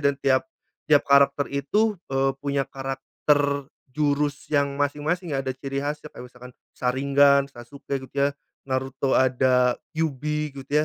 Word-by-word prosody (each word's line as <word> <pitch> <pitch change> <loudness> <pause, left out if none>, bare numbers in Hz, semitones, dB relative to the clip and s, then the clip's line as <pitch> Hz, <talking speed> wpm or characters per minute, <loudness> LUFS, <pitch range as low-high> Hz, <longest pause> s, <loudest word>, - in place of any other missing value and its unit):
dan 140 -1 +2
tiap 135 +3 +1 0.4
tiap 145 -2 +5
karakter 140 0 +4
itu, 205 +10 +1
eee, 135 0 +1
punya 140 -1 -1
karakter 140 +1 -1 0.2
jurus 145 0 0
yang 140 -2 +1
masing-masing 150 +3 -1
ada 135 -1 -2
ciri 135 +1 -5
khasnya, 150 +1 -4
kayak 125 - -11
misalkan 125 0 -12 0.2
sharingan, 140 +2 +3
Sasuke 140 +3 -6
gitu 130 +1 -13
ya, 140 0 +3 0.4
Naruto 130 0 -2
ada 125 -1 +3 0.2
kyubi 150 -1 -2
gitu 135 +1 -10
140 Hz, 135 wpm, -24 LUFS, 135-145 Hz, 0.4 s, tiap